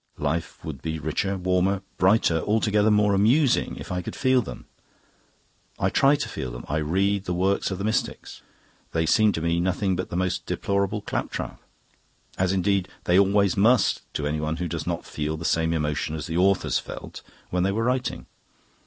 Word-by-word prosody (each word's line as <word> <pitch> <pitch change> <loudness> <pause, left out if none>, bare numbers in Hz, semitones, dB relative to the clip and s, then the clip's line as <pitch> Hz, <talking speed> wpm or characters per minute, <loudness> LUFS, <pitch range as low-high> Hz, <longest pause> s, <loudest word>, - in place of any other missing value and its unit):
Life 80 +3 -3
would 70 -5 -6
be 80 0 -3
richer, 95 +6 -2
warmer, 95 +1 +1 0.2
brighter, 95 -3 +4
altogether 105 +1 +2
more 105 -1 +3
amusing, 120 +8 +3
if - - -8
I 90 0 -1
could - - -7
feel 130 -1 +3
them. - - -9 1.1
I - - 0
try 140 +2 +4
to - - -3
feel 65 - -5
them. - - -8
I 75 - -1
read 95 +6 0
the 90 - -2
works 95 +3 +1
of 95 - -3
the 100 - -4
mystics. 110 +1 -2 0.5
They 80 0 +1
seemed 105 +3 +3
to 80 - -3
me 85 +1 +1
nothing 95 +2 0
but 90 - -4
the - - -5
most 90 0 -1
deplorable 100 +1 -1
claptrap - - -4 0.7
as 95 -1 +1
indeed 95 0 +1 0.2
they 90 +2 +4
always 100 0 +3
must 115 +5 +3
to 75 - -2
anyone 75 +1 -1
who 90 +1 -3
does - - -4
not - - -2
feel 75 +1 -3
the 80 - -7
same 80 0 +1
emotion 75 -1 -1
as 75 -2 -5
the 80 - -4
authors 95 +2 +2
felt - - -9 0.3
when 90 - +1
they 95 +2 +2
were 110 +3 -1
writing. 125 +1 -1
95 Hz, 185 wpm, -25 LUFS, 80-100 Hz, 1.1 s, brighter